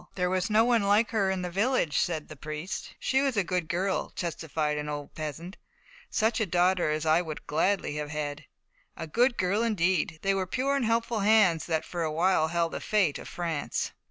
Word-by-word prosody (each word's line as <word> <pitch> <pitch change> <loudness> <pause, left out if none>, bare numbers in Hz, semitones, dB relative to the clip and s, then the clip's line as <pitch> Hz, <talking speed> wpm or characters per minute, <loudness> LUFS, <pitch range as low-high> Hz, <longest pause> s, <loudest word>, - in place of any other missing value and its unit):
"There 180 -1 0
was 185 +2 0
no 215 +2 +4
one 240 -2 +3
like 205 +4 +3
her 200 -4 +1
in 190 -1 -1
the 180 - -4
village," 200 - +1
said 160 -3 -1
her 155 - -10
priest. 155 +5 -6
"She 265 0 +1
was 270 -5 0
a 200 - +3
good 180 -2 -2
girl," 190 +3 -1
testified 155 -3 -2
an 150 0 -4
old 145 -1 -6
peasant, 160 +5 -6 0.5
"such 220 +1 +1
a 220 - 0
daughter 180 -1 +2
as 155 +1 -1
I 160 +2 +4
would 155 -3 -7
gladly 160 -1 0
have 150 0 -4
had." 150 -1 -4 0.5
A 165 - -4
good 240 - +2
girl, 190 +4 +1
indeed: 185 -7 +1
they 195 0 +2
were 190 -1 -1
pure 265 +7 0
and 275 -4 0
helpful 230 0 0
hands 200 -6 +4
that 160 -2 0
for 175 - -5
a 160 -1 0
while 165 0 +2
held 170 0 0
the - - -5
fate 195 -9 +1
of - - -9
France. 165 -5 -3
180 Hz, 210 wpm, -28 LUFS, 155-210 Hz, 0.5 s, no